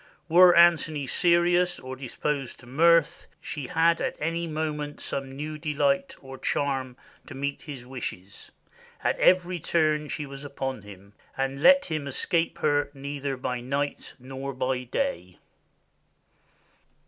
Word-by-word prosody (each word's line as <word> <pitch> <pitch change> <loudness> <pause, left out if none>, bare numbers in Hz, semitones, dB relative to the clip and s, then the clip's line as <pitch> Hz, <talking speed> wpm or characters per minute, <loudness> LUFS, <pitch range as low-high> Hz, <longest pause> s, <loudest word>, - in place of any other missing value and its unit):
Were 175 +2 +7
Antony 165 -4 +4
serious 175 +2 +3
or 130 0 -7
disposed 135 +1 -4
to - - -15
mirth, 165 +5 +3
she 145 -4 -6
had 165 +3 +2
at - - -2
any 165 +2 -2
moment 150 -2 -4
some 135 -1 -4
new 150 +2 -5
delight 275 - 0
or 135 -1 -10
charm 135 -3 -1 0.3
to - - -9
meet 140 +1 -3
his 135 -5 -9
wishes, 105 -7 -7 0.5
at - - 0
every 180 -1 +3
turn 155 -2 +1
she 150 0 -4
was 140 0 -9
upon 135 -3 -4
him, 100 0 -14 0.2
and 135 +1 -2
let 275 - +6
him 155 -3 -3
escape 165 +5 0
her 145 -1 +1
neither 140 0 -4
by 125 -1 -3
night 140 +3 -3
nor 135 +1 -7
by 130 0 -1
day." 120 - -3
145 Hz, 135 wpm, -26 LUFS, 135-165 Hz, 0.5 s, Were